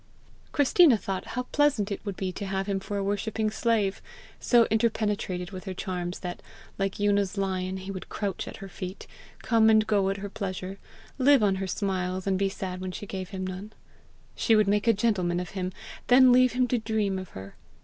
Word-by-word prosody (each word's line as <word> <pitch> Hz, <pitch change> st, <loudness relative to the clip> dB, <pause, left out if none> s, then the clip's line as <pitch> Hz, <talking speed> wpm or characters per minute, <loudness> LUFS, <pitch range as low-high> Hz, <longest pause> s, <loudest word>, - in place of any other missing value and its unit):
Christina 285 Hz, -1 st, +5 dB
thought 195 Hz, -2 st, -4 dB
how 250 Hz, -, 0 dB
pleasant 275 Hz, -9 st, +2 dB
it 200 Hz, -, -4 dB
would 200 Hz, -3 st, -5 dB
be 190 Hz, -1 st, -2 dB
to 195 Hz, +2 st, -6 dB
have 190 Hz, 0 st, -1 dB
him 195 Hz, -1 st, -1 dB
for 200 Hz, +1 st, -4 dB
a 200 Hz, -, -1 dB
worshipping 215 Hz, +2 st, -1 dB
slave 210 Hz, -4 st, 0 dB, 0.4 s
so 240 Hz, -2 st, +5 dB
interpenetrated 210 Hz, -5 st, 0 dB
with 185 Hz, 0 st, -8 dB
her 190 Hz, -2 st, -5 dB
charms 180 Hz, -1 st, -4 dB
that, 175 Hz, -1 st, -5 dB, 0.4 s
like 195 Hz, 0 st, -1 dB
Una's 205 Hz, -1 st, +1 dB
lion, 190 Hz, -1 st, -1 dB
he 190 Hz, +1 st, -6 dB
would 185 Hz, -1 st, -7 dB
crouch 200 Hz, -3 st, -3 dB
at -, -, -7 dB
her -, -, -8 dB
feet, 185 Hz, +1 st, -7 dB, 0.4 s
come 225 Hz, -1 st, +4 dB
and 215 Hz, -1 st, +5 dB
go 200 Hz, -3 st, +2 dB
at 195 Hz, -, -1 dB
her 200 Hz, +1 st, -6 dB
pleasure, 190 Hz, 0 st, -5 dB, 0.4 s
live 270 Hz, -2 st, +5 dB
on 195 Hz, -2 st, +2 dB
her 190 Hz, 0 st, -3 dB
smiles, 185 Hz, -1 st, -2 dB
and 190 Hz, -1 st, +1 dB
be 195 Hz, 0 st, +2 dB
sad 185 Hz, -1 st, -5 dB
when 185 Hz, 0 st, -4 dB
she 205 Hz, -, -7 dB
gave 190 Hz, -2 st, -5 dB
him 190 Hz, -1 st, -4 dB
none. 190 Hz, +3 st, -6 dB, 0.6 s
She 225 Hz, -, +3 dB
would 215 Hz, -2 st, +4 dB
make 205 Hz, +2 st, +1 dB
a 230 Hz, -, +6 dB
gentleman 195 Hz, -5 st, +1 dB
of 180 Hz, -1 st, -5 dB
him, 185 Hz, -2 st, -3 dB, 0.4 s
then 255 Hz, 0 st, +7 dB
leave 255 Hz, 0 st, +5 dB
him 250 Hz, 0 st, +2 dB
to 245 Hz, -, +1 dB
dream 215 Hz, -3 st, -1 dB
of 185 Hz, -, -8 dB
her! 95 Hz, +1 st, -9 dB
195 Hz, 205 wpm, -27 LUFS, 185-220 Hz, 0.6 s, then